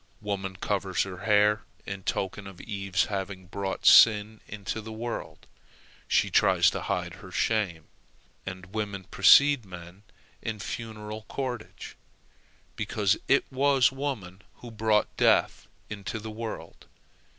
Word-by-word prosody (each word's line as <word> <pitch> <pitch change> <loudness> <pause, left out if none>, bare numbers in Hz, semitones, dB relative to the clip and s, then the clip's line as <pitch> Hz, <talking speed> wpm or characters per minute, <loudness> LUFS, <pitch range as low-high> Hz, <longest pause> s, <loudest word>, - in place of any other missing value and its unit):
Woman 95 -2 -3
covers 95 -1 -1
her 95 -2 -8
hair 105 0 +4 0.2
in 100 0 -6
token 95 +1 -3
of 95 -2 -11
Eve's 95 -3 -1
having 95 -2 -5
brought 95 +1 -5
sin 110 -1 +6
into 105 +1 -5
the 110 +1 -9
world; 115 +2 -6 0.6
she - - +2
tries - - +4
to - - -4
hide - - -2
her - - -11
shame; 100 -8 0 0.6
and 95 0 -8
women 100 -3 -3
precede 140 +7 +6
men 90 0 -11 0.4
in 110 - -3
a - - -15
funeral 110 0 -6
cortege, 125 -5 -5 0.8
because - - +1
it - - +3
was 135 -2 +3
woman 125 -10 -5
who 120 - -11
brought 110 -1 +1
death - - +2 0.2
into 105 +1 -5
the 110 0 -7
world. 110 +1 -7
105 Hz, 130 wpm, -27 LUFS, 95-110 Hz, 0.8 s, sin